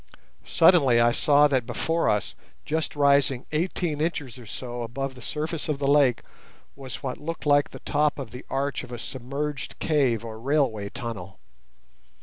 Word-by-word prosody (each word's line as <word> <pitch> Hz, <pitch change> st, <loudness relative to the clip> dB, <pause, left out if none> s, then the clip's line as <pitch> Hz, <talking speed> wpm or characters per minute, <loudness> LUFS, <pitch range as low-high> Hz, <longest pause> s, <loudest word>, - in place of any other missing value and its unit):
Suddenly 160 Hz, -8 st, +5 dB
I 120 Hz, 0 st, +5 dB
saw 145 Hz, +4 st, +5 dB
that 130 Hz, -5 st, 0 dB
before 160 Hz, +7 st, 0 dB
us, 105 Hz, -1 st, 0 dB, 0.3 s
just 160 Hz, 0 st, -2 dB
rising 140 Hz, -2 st, +3 dB
eighteen 160 Hz, -1 st, -1 dB
inches 145 Hz, -7 st, -2 dB
or 120 Hz, -, -12 dB
so 120 Hz, +2 st, -6 dB
above 130 Hz, +4 st, -4 dB
the 125 Hz, -, -13 dB
surface 155 Hz, +5 st, -4 dB
of 150 Hz, -, 0 dB
the 140 Hz, -, -2 dB
lake, 140 Hz, -4 st, +4 dB, 0.5 s
was 135 Hz, +1 st, -8 dB
what 130 Hz, -2 st, -4 dB
looked 165 Hz, +2 st, -5 dB
like 145 Hz, -1 st, +4 dB
the -, -, -11 dB
top 150 Hz, 0 st, +1 dB
of 135 Hz, -6 st, -6 dB
the 125 Hz, +2 st, -9 dB
arch 140 Hz, 0 st, -1 dB
of 125 Hz, -, -11 dB
a 120 Hz, -, -5 dB
submerged 140 Hz, +4 st, -5 dB
cave 130 Hz, -8 st, +1 dB
or 110 Hz, -1 st, -7 dB
railway 125 Hz, -6 st, 0 dB
tunnel. 100 Hz, -7 st, -7 dB
140 Hz, 165 wpm, -26 LUFS, 120-150 Hz, 0.5 s, Suddenly